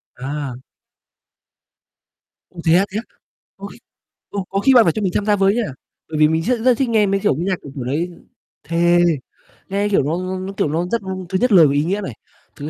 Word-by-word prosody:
À. 140 0 -5 2.0
Ô, 175 - -14
thế 165 - +4
á, 195 - +3
thế 200 - -3
á? 225 - -3 0.5
Ôi, - - -9 0.5
ô, 200 -1 -3
có 195 - -1
khi 265 +6 +4
bạn 240 -3 +7
phải 165 - +2
cho 215 - -3
mình 190 -3 0
tham 205 - 0
gia 210 -1 +3
với 195 +1 +2
nha, 240 - +1 0.5
bởi 155 - -4
vì 155 - +6
mình 160 +1 0
rất 245 +4 0
rất 250 0 +3
thích 265 -1 0
nghe 220 -2 +3
mấy 195 0 +1
kiểu - - +2
âm 160 +6 -3
nhạc 190 -1 +1
kiểu, 140 - -9
kiểu 135 - -4
đấy. 150 +8 -2 0.6
Thề, 175 +1 +3 0.7
nghe 200 +2 0
kiểu 195 -9 +2
nó 160 +5 -1
nó 185 0 -4
nó, 190 +1 -6
kiểu, 175 - 0
nó 165 +4 -1
rất 235 - 0 0.3
thứ 190 - 0
nhất 250 - +2
lời 170 -6 +7
có 140 - 0
ý 145 +1 +2
nghĩa 195 +6 -1
này, 190 - -5 0.4
thứ 145 +1 -6
185 Hz, 230 wpm, -19 LUFS, 160-205 Hz, 2.0 s, bạn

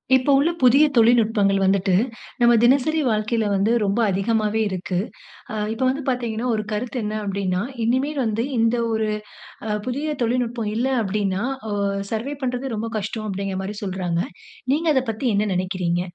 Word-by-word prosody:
இப்போ 260 +2 +2
உள்ள 305 +4 +3
புதிய 260 +4 +6
தொழில்நுட்பங்கள் 220 -4 +4
வந்துட்டு, 190 -1 +2 0.5
நம்ம 240 0 +6
தினசரி 280 +5 +3
வாழ்க்கையில 215 +1 0
வந்து 200 +3 +2
ரொம்ப 200 +3 0
அதிகமாவே 215 +2 0
இருக்கு. 185 -1 -2 0.5
ஆ - - -4 0.2
இப்ப 235 +4 -3
வந்து 280 +3 -2
பாத்தீங்கன்னா, 240 -2 -2
ஒரு 215 - -2
கருத்து 235 +4 -3
என்ன 210 0 -3
அப்டின்னா, 195 -2 -1 0.2
இனிமே 260 +5 +1
வந்து 225 +1 0
இந்த 230 +1 +3 0.2
ஒரு 220 -1 0 0.6
அ - - -3 0.2
புதிய 295 +4 -2
தொழில்நுட்பம் 235 -2 -1
இல்லை 260 +4 0
அப்டின்னா, 200 0 -1 0.3
ஒ - - -1 0.4
சர்வைவ் 270 +6 -3
பண்றது 250 0 -2
ரொம்ப 225 +2 -3
கஷ்டம் 215 +1 -4
அப்டிங்குற 195 -1 -3
மாரி 205 +2 -5
சொல்றாங்க. 180 -3 -1 0.5
நீங்க 325 +3 0
அத 260 - +3
பத்தி 225 +4 -3
என்ன 210 +1 +1
நெனக்கிறீங்க? 180 -1 -1
220 Hz, 155 wpm, -22 LUFS, 195-245 Hz, 0.6 s, புதிய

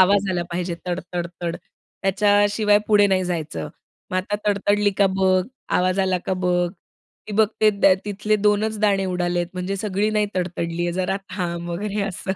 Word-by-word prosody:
आवाज 195 +1 +4
आला 175 -1 0
पाहिजे, 175 0 -2
तडतडतड, 175 -1 -4 0.5
त्याच्याशिवाय 205 +1 +3
पुढे 205 -1 +6
नाही 185 -1 +1
जायचं. 155 - -3 0.4
मग 185 - -1
आता 200 +3 -1
तडतडली 205 0 +2
का? 200 - +5
बघ, 185 -1 +3 0.3
आवाज 185 +1 +1
आला 185 -1 +1
का? - - 0
बघ, 180 -1 +2 0.6
ती - - -5
बघते 215 0 +3 0.3
तिथले 210 +1 0
दोनच 210 +1 +1
दाणे 200 -2 +2
उडालेत, 175 -1 -1
म्हणजे 185 +2 -3
सगळी 205 +1 0
नाही 210 -1 +1
तडतडली 175 -2 -2
आहे, 175 - -1
जरा 185 +1 -1 0.2
थांब 175 -2 -3
वगैरे," 205 +4 -3
असं. 190 -1 -3
190 Hz, 155 wpm, -22 LUFS, 180-205 Hz, 0.6 s, पुढे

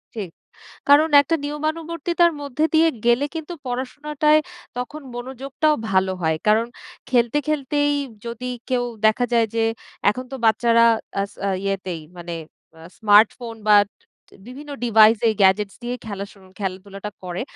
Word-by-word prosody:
ঠিক। 205 -5 -4 0.6
কারণ 295 +3 +6
একটা 285 +4 0
নিয়মানুবর্তিতার 330 +3 0
মধ্যে 285 +1 -2
দিয়ে 320 +1 +5 0.2
গেলে 240 +3 +3
কিন্তু 325 +1 -5
পড়াশোনাটায় 295 +4 +1 0.4
তখন 250 +5 -5
মনোযোগটাও 265 +5 -1 0.2
ভালো 190 0 +2
হয়। 160 -1 +1
কারণ 220 +2 +4 0.4
খেলতে, 240 +2 +2
খেলতেই 290 0 +1 0.3
যদি 235 +2 -5 0.2
কেউ 250 -2 +1 0.2
দেখা 220 +3 +3
যায় 230 -1 +4
যে, 225 0 +2 0.5
এখন 255 +5 -5
তো - - -3
বাচ্চারা 230 +1 +4 0.4
আস 200 0 -3
আ - - +1 0.2
ইয়েতেই 190 -4 -3 0.2
মানে, 175 -1 -6 0.4
আ - - -15 0.2
স্মার্টফোন 220 +2 +4
বা 210 - +8 0.7
বিভিন্ন 290 +4 -10
ডিভাইসেই 225 0 +5
গ্যাজেটস 195 +1 +3
দিয়েই 245 +1 -4
খেলা 200 -2 -4
শু - - -20 0.2
খেলাধুলাটা 195 +1 -5
করে। 180 0 -4
240 Hz, 135 wpm, -22 LUFS, 210-290 Hz, 0.7 s, বা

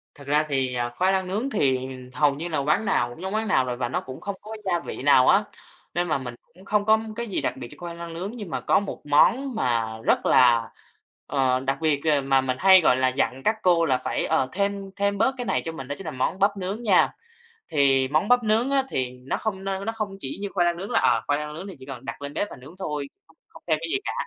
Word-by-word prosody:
Thật 140 -1 -13
ra 150 +2 +2
thì, 130 -3 0
à, 120 0 -1
khoai 185 +10 +1
lang 190 -1 0
nướng 215 +8 -2
thì 140 - +2 0.4
hầu 145 +1 +2
như 165 +4 -5
là 160 -3 -2
quán 150 +10 +1
nào 120 -10 +1
cũng 120 +8 -11
giống 190 +1 -4
quán 220 +1 -1
nào 130 -9 +3
rồi 125 -1 -3
và 120 -1 -2
nó - - -1
cũng 130 0 -9
không 200 -1 -4
có 220 +1 -8
gia 175 -3 +1
vị 165 - -7
nào 130 -2 +5
á, 205 - +5 0.5
nên 175 0 0
mà 155 -3 +1
mình 125 -2 -7 0.2
cũng 185 +2 -17
không 205 0 +1
có 220 0 +5 0.2
cái 235 +1 -4
gì 200 - -2
đặc - - -2
biệt 125 -2 -7
cho - - -11
khoai 170 -1 -6
lang 170 0 -7
nướng. 185 +5 -5
Nhưng 205 -6 -7
mà - - -3
có - - +3
một 200 - -6
món 240 - +3
mà 120 - +1 0.2
rất - - +2
là, 120 -3 +5 0.6
ờ, 130 -2 +1
đặc 135 +1 -1
biệt, 150 -3 +1
ờ, 150 -3 +3
mà 135 0 +3
mình 130 -1 -2
hay, 190 -1 +7
gọi 125 - +4
là, 130 0 +2
dặn 130 0 -1
các 220 - +2
cô 170 -2 +4
là 130 -4 +2
phải, - - -2
ờ, 130 - +1
thêm 200 0 -2
thêm 200 0 0
bớt 265 +5 +2
cái 245 - -4
này - - 0
cho 165 - -3
mình 135 -5 -8
đó 145 - -4
chính 195 - -9
là 155 - -3
món 150 +7 -2
bắp 200 +1 +2
nướng 195 +5 -4
nha. 200 -5 +4 0.6
Thì 135 -3 +3
món 155 +8 +1
bắp 245 -1 +4
nướng 225 +5 +2
á 275 -1 +3
thì 130 - -2
nó 125 +1 -4
không 195 -3 -3
nơ 195 0 -3
nó 225 - 0
không 215 -3 -5
chỉ 135 - -6
như 200 - -3
khoai 175 -3 +2
lang 170 0 +1
nướng 195 +3 -6
là, - - +3
ờ, - - +3
khoai 145 0 +1
lang 150 0 -5
nướng 170 +6 -7
thì 190 - -8
chỉ 130 - -11
cần 135 -2 -9
đặt 115 - -6
lên 140 0 -6
bếp 205 - -1
và - - -9
nướng 135 +5 -13
thôi 150 -6 -3 0.4
không - - -16
thêm 155 -2 +2
cái 165 - -3
gì - - +2
cả. - - -2
160 Hz, 280 wpm, -25 LUFS, 135-200 Hz, 0.6 s, hay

